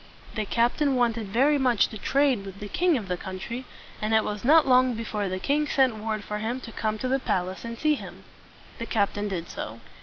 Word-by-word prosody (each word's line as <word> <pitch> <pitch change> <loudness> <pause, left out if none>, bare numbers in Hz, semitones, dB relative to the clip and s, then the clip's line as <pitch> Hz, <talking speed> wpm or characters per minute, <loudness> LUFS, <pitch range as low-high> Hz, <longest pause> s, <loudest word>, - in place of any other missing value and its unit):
The 215 -2 -2
captain 245 +6 +2
wanted 230 -3 +1
very 275 +8 +3
much 250 -5 +3
to 220 - -7
trade 270 -5 +2
with 195 0 -9
the 205 - -6
king 345 - +2
of 210 -5 -5
the 180 -1 -1
country; 190 +8 -6 0.4
and 215 +1 +1
it 220 - +4
was 210 -1 -4
not 310 +4 +6
long 255 -1 +4
before 210 -3 -3
the 185 - -2
king 295 +9 0
sent 260 -5 +2
word 215 -1 -3
for 210 0 -4
him 230 +4 -2
to 230 - -9
come 215 -1 -2
to 255 - -3
the 265 +1 +1
palace 185 -5 -2
and 230 0 -6
see 305 +3 +2
him. 290 - -7 0.6
The 230 - -4
captain 205 -1 0
did 175 -4 -4
so. - - -6
230 Hz, 220 wpm, -26 LUFS, 205-260 Hz, 0.6 s, not